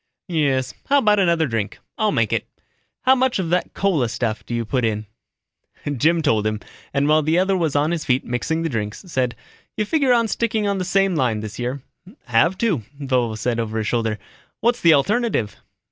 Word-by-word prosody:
"Yes. 140 -6 +1
How 285 - +4
about 210 -6 +4
another 170 -4 +3
drink? 115 -6 -3 0.2
I'll 215 -1 +1
make 115 - +1
it. - - -1 0.6
How 260 - +6
much 260 -1 +1
of 175 -4 -2
that 180 - 0
cola 165 -12 +1
stuff 110 -1 -2
do 120 - -4
you 115 -1 -1
put 125 +3 -1
in?" 110 -1 -1 0.9
Jim 160 +6 +2
told 110 -7 +2
him, 110 -1 -2 0.3
and 140 +1 +1
while 155 +1 +4
the 155 +3 +1
other 190 +1 +2
was 165 -6 0
on 145 +3 +2
his 170 -2 -2
feet 130 -1 +1
mixing 160 +7 -1
the - - 0
drinks, 105 - -4
said, 130 -8 -1 0.4
"You 215 - +1
figure 280 +1 +2
on 235 -2 +3
sticking 220 0 0
to 200 -1 +1
the 190 -2 -2
same 195 +1 +2
line 120 -7 +1
this 110 +1 -7
year?" 125 +2 -3 0.4
"Have 130 +10 +2
to," 200 - +1 0.2
Vovo 125 -5 0
said 120 +1 -1
over 110 -1 -2
his 110 - -1
shoulder. 110 -1 0 0.4
"What's 240 +1 +1
the 165 -2 +7
alternative?" 200 - 0
145 Hz, 200 wpm, -21 LUFS, 115-195 Hz, 0.9 s, the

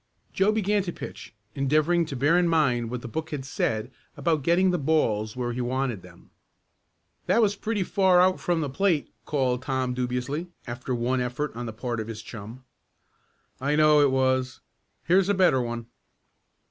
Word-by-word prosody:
Joe 195 +2 +3
began 210 -1 +1
to 185 -2 -4
pitch, 110 - -9 0.2
endeavoring 155 +5 +2
to 140 - -5
bear 145 +6 +3
in 175 -1 +3
mind 130 -8 +2
what 125 0 -5
the - - -5
book 160 +7 -4
had 145 -4 -5
said 110 -2 -2 0.3
about 160 -3 +1
getting 175 +6 +3
the 180 - 0
balls 115 -8 +1
where 120 -1 -2
he 125 - -3
wanted 125 -4 -2
them. - - -17 1.0
"That - - +3
was 210 -3 +3
pretty 215 -1 -2
far 185 -1 +3
out 185 +1 +4
from 175 -2 0
the 150 - -1
plate," 175 -1 0
called 130 -4 0
Tom 130 -1 -1
dubiously, 125 +6 -2 0.2
after 120 +2 -4
one 125 +2 0
effort 125 +4 -3
on 120 0 -5
the - - -4
part 120 +1 -4
of 110 - -4
his 110 -1 -7
chum. 115 +3 -9 1.0
"I 140 +3 0
know 150 -1 +5
it 145 - +5
was. 130 -1 0 0.4
Here's 185 +3 +3
a 200 - +3
better 180 -9 +4
one." 120 -1 -4
135 Hz, 180 wpm, -26 LUFS, 125-170 Hz, 1.0 s, know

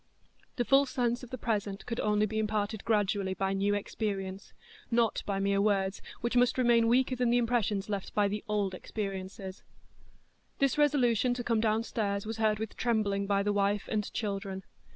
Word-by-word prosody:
The 240 - 0
full 275 +2 +5
sense 245 -2 0
of 250 - -10
the 255 - -5
present 205 -3 -2
could 230 -1 -4
only 210 0 +2
be 220 +1 -2
imparted 215 -1 -1
gradually 200 -3 +1
by 195 +1 0
new 200 +1 +1
experience,—not 215 - -3
by 200 -1 0
mere 200 0 +2
words, 195 -2 +1 0.2
which 235 +1 -1
must 245 +1 +4
remain 235 -2 +4
weaker 255 +2 +3
than 245 -1 +1
the 240 - +4
impressions 225 -4 0
left 200 -2 -4
by 205 -1 +3
the 205 +1 -3
old 205 -3 0
experience. 195 -1 -5 1.2
This 275 +2 +1
resolution 250 -5 +3
to 245 - -4
come 230 -2 +1
downstairs 215 -2 0
was 225 +1 -4
heard 215 -1 +2
with 220 0 -5
trembling 205 -4 0
by 200 0 +2
the 205 0 +1
wife 205 0 +1
and 210 -2 -1
children. 195 -2 -3
215 Hz, 175 wpm, -30 LUFS, 200-235 Hz, 1.2 s, full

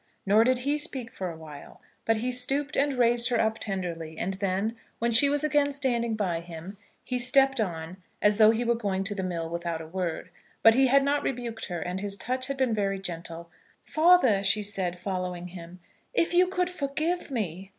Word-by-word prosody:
Nor 210 +3 +5
did 255 +2 +2
he 290 +1 +1
speak 255 -5 -4
for 185 -2 -4
awhile; 160 -3 -11 0.3
but 225 0 +2
he 245 +3 -2
stooped 275 +4 0
and 285 +1 +2
raised 240 0 +4
her 240 -2 +1
up 220 0 0
tenderly; 170 -5 -5
and 190 +4 -2
then, 195 +3 -1 0.2
when 235 +1 0
she 250 +5 +7
was 290 +1 0
again 295 -1 +2
standing 240 -5 0
by 185 -6 -1
him, 170 +3 -9 0.3
he 250 -1 -2
stepped 270 +1 +4
on 170 -2 -4 0.2
as 210 0 +3
though 215 -1 +7
he 225 +2 +1
were 235 0 +2
going 200 -5 -2
to 200 +1 -2
the 200 - -4
mill 170 -3 -3
without 170 0 -3
a 160 - -8
word. 170 0 -4 0.3
But 225 - +8
he 265 +2 +4
had 275 +2 +4
not 285 +1 +1
rebuked 235 -3 -4
her, 175 -2 -4
and 180 +3 -3
his 200 0 +1
touch 255 +5 -2
had 275 -1 -4
been 260 -3 +1
very 200 -2 0
gentle. 170 -2 -7 0.3
"Father," 310 - +4
she 205 +2 +2
said, 185 -3 -1
following 180 -1 -4
him, 175 0 -11 0.4
"if 340 -6 +1
you 360 +1 +5
could 365 0 -1
forgive 315 +3 -2
me! 195 - -4
220 Hz, 200 wpm, -27 LUFS, 180-260 Hz, 0.4 s, But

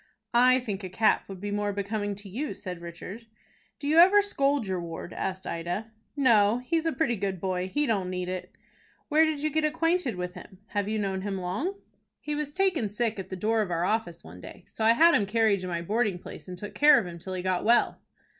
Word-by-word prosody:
"I 255 +2 +6
think 210 -5 -5
a 185 - -5
cap 215 +3 +2
would 190 -2 -7
be 205 +2 -4
more 205 0 -1
becoming 205 +1 -3
to 205 +1 -11
you," 255 +11 -4
said 180 -4 -7
Richard. 180 +7 -9 0.5
"Do 285 - -5
you 315 +3 +5
ever 390 +4 +7
scold 280 - 0
your 185 -2 -2
ward?" 170 +1 -7
asked 190 0 -4
Ida. 175 +7 -4 0.2
"No, 230 -6 +4
he's 330 +4 0
a - - +2
pretty 280 -7 0
good 195 -2 -3
boy. 185 0 -2
He 295 0 +1
don't 200 -7 0
need 180 -1 -3
it." 185 0 -5 0.6
"Where 315 +1 +5
did 310 -2 -2
you 310 - +1
get 315 +2 +1
acquainted 330 - +1
with 180 0 -4
him? 180 +1 -12
Have 205 -1 -1
you 220 - -1
known 195 -2 -2
him 195 0 -3
long?" 200 - -2 0.4
"He 300 - -4
was 295 -1 -3
taken 370 - +1
sick 215 0 -1
at 190 0 -6
the 185 - -4
door 220 +4 +1
of 205 - -2
our 170 0 0
office 215 -5 -1
one 85 +3 -12
day. 185 - -11
So 220 - -5
I 225 +1 +6
had 335 +7 +6
him 200 - +2
carried 220 -1 +2
to 185 - -6
my 170 -1 -3
boarding 210 0 0
place, 180 - -11
and 180 -1 -7
took 205 +3 -7
care 295 0 +7
of - - 0
him 170 -1 -8
till 185 +2 -6
he 180 - -4
got 185 -1 0
well." 235 +2 +3
205 Hz, 235 wpm, -27 LUFS, 185-270 Hz, 0.6 s, ever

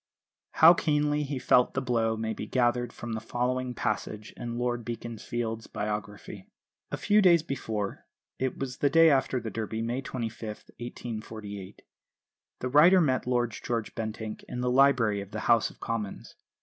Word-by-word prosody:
How 165 +2 +8
keenly 150 -2 +1
he 140 -1 -3
felt 125 -1 +3
the - - +2
blow 115 -4 0
may 110 0 -2
be - - -6
gathered 120 -1 +1
from 120 0 -6
the 110 - -3
following 125 +2 -2
passage 105 -1 -3
in 120 0 -5
Lord 120 -1 -1
Beaconsfield's 115 0 -4
biography: 105 -2 -5 0.4
"A - - -3
few 210 0 +3
days 170 -4 +5
before 110 -9 -4 0.3
it 130 -1 -1
was 130 -1 -4
the 145 - +2
day 165 +2 +6
after 130 -2 +2
the 115 -2 -6
Derby, 110 +1 -3
May 120 +3 -2
25, 120 -4 -5 0.4
1848 110 -4 -7 0.8
the 125 - -1
writer 165 +8 +7
met 130 -7 +1
Lord 120 -2 +1
George 115 0 -3
Bentinck 110 -1 -5
in 125 - -4
the 125 0 +1
library 125 -6 +4
of 100 - -9
the 110 +1 -5
House 115 -1 +3
of - - -18
Commons. 110 -4 -4
120 Hz, 160 wpm, -28 LUFS, 110-130 Hz, 0.8 s, How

